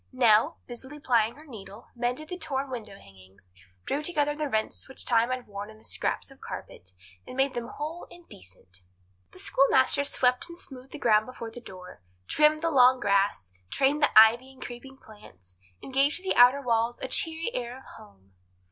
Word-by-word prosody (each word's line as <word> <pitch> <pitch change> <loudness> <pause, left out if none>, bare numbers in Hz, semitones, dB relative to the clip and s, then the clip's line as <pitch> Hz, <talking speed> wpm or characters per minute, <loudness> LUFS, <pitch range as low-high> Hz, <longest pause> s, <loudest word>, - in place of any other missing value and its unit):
Nell, 250 +3 +3
busily 260 +4 -9
plying 235 -5 +1
her 305 +2 -15
needle, 205 -7 -12
mended 245 +5 -3
the 360 - -5
torn 275 -4 -3
window 225 -5 -7
hangings, 95 - -19 0.4
drew 290 - -1
together 295 -2 0
the 300 -1 -3
rents 220 +3 -2
which 265 - -9
time 235 0 +2
had 255 -1 -3
worn 205 0 -8
in 215 - -14
the 220 - -21
scraps - - -3
of - - -18
carpet, 90 - -9 0.4
and 255 - -9
made 270 0 +2
them 235 -1 -4
whole 315 +6 -7
and 350 -1 -15
decent. 90 0 -12 0.5
The - - -17
schoolmaster 275 +1 +3
swept 250 0 +1
and 340 - -10
smoothed 265 -6 -11
the - - -7
ground 215 -5 +3
before 230 -3 -8
the 240 - -10
door, 185 - -12 0.2
trimmed 305 - +3
the 330 - +1
long 255 -2 +5
grass, 200 - 0 0.2
trained 280 +3 +1
the 290 - +4
ivy 235 +4 +5
and 265 - -19
creeping 265 +2 -10
plants, 95 - -17 0.3
and 265 - -9
gave 275 +3 +3
to 375 - -5
the 380 - 0
outer 250 +3 +6
walls 235 0 0
a 260 - -4
cheery 325 - -1
air 245 0 -4
of 265 - -15
home. 95 -1 -18
250 Hz, 190 wpm, -27 LUFS, 215-280 Hz, 0.5 s, outer